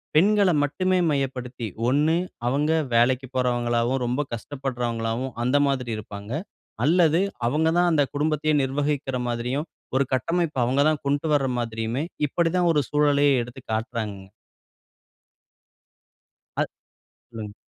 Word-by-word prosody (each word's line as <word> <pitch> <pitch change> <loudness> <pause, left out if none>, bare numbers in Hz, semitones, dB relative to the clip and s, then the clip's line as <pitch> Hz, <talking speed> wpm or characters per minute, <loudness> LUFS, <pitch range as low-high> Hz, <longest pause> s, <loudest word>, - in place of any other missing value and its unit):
பெண்கள 200 +3 +5
மட்டுமே 185 +5 +1
மையப்படுத்தி, 130 -4 -3 0.2
ஒண்ணு 150 +5 +3 0.3
அவுங்க 145 +5 +1 0.2
வேலைக்கு 130 +2 +3
போறவங்களாவும், 120 0 +1
ரொம்ப 125 +4 0
கஷ்டப்படுறவங்களாவும், 120 -1 -3
அந்த 130 +4 +3
மாதிரி 130 -3 -1
இருப்பாங்க 105 +1 -8 0.5
அல்லது 165 +2 +4 0.3
அவுங்க 155 +6 +2
தான் 175 0 +4
அந்த 150 -3 +4
குடும்பத்தையே 155 +1 +1
நிர்வகிக்கிற 135 -1 -1
மாதிரியும், 125 +6 -2 0.3
ஒரு 135 - +4
கட்டமைப்பு 165 +2 0
அவுங்க 130 +4 +2
தான் 155 -2 -1
கொண்ட்டு 145 +3 0
வர 140 -2 +2
மாதிரியுமே! 115 +3 -2 0.2
இப்பிடிதான் 170 +3 +1
ஒரு 150 - +3
சூழலையே 145 -1 +4
எடுத்து 120 +2 -11
காட்டுறாங்கங்க. 110 -4 -3 2.3
அ. - - +3 0.7
சொல்லுங்க. 105 -2 -7
135 Hz, 110 wpm, -24 LUFS, 120-150 Hz, 2.3 s, பெண்கள